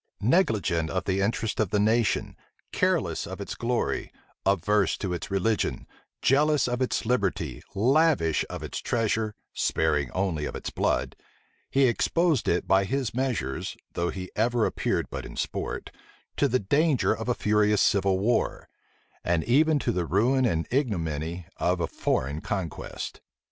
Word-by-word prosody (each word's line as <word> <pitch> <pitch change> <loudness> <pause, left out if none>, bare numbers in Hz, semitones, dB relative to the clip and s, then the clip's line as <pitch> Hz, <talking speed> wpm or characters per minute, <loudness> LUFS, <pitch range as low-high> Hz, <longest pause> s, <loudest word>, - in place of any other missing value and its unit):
Negligent 105 - +2
of 95 +2 -1
the 95 0 0
interests 110 +2 -1
of 105 - 0
the 105 - +1
nation, 110 +2 +1 0.4
careless - - 0
of - - -7
its - - -5
glory, 120 0 -1 0.4
averse 100 +1 +2
to 95 -3 -3
its 85 - -5
religion, 100 +3 0 0.4
jealous 150 +2 +3
of 125 +1 -2
its 130 - 0
liberty, 110 -5 -1
lavish 130 - +3
of - - -6
its - - -4
treasure, 110 -2 0 0.2
sparing 75 -4 +1
only 90 -6 -1
of - - -5
its - - -5
blood, - - 0 0.5
he 135 - +3
exposed 155 +4 +2
it 85 - +1
by 95 0 +4
his 130 +3 -2
measures, 120 - -2 0.2
though 85 0 -1
he 95 -1 -6
ever 115 +1 +2
appeared - - -1
but - - -4
in - - -9
sport, - - -4 0.4
to - - +3
the 130 - +2
danger 140 - +2
of 115 +2 -5
a 120 - +2
furious 105 -1 +2
civil 95 -1 +3
war, 110 +5 0 0.6
and 85 -2 +1
even 150 +6 +4
to 130 - 0
the 90 -5 -1
ruin 120 - +3
and 80 -6 -1
ignominy 85 - -1
of 90 +1 +1
a 85 - +1
foreign 70 0 -1
conquest. 95 -6 -5
105 Hz, 155 wpm, -27 LUFS, 90-125 Hz, 0.6 s, by